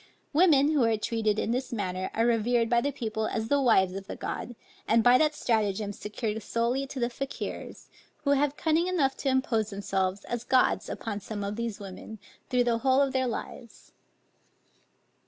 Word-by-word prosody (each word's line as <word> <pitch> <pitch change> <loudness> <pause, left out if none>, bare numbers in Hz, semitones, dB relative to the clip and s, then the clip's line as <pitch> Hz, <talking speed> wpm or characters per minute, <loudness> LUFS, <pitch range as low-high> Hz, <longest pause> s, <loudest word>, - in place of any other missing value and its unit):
Women 300 -3 +5
who 295 -5 +3
are 225 -1 +2
treated 215 -1 0
in 220 - -1
this 255 +2 -2
manner 185 -4 -3
are 225 - +2
revered 235 0 +2
by 235 0 +4
the 285 - -1
people 220 -3 -3
as 225 -1 -3
the 285 0 +3
wives 190 -7 +4
of 195 0 -7
the - - -5
gods, 240 - -5 0.3
and 225 +1 +4
by 245 +2 +6
that 305 -1 +2
stratagem 210 -4 0
secured 215 +2 -4
solely 235 +6 -1
to 270 - -6
the 240 - +1
Fakiers, 265 +3 -6 0.4
who 280 - +2
have 285 +1 +2
cunning 325 +2 +1
enough 300 -8 +1
to 275 - -1
impose 260 -5 +1
themselves 195 -1 -2
as 240 -1 -4
gods 255 +1 +2
upon 205 -2 -4
some 205 0 -6
of 200 +1 -3
these 230 -2 -4
women, 200 +2 -9 0.3
through 250 -2 +3
the 235 -1 +1
whole 260 +2 +3
of 275 -1 +2
their 260 -1 +1
lives. 235 0 -7
235 Hz, 185 wpm, -28 LUFS, 215-265 Hz, 0.4 s, by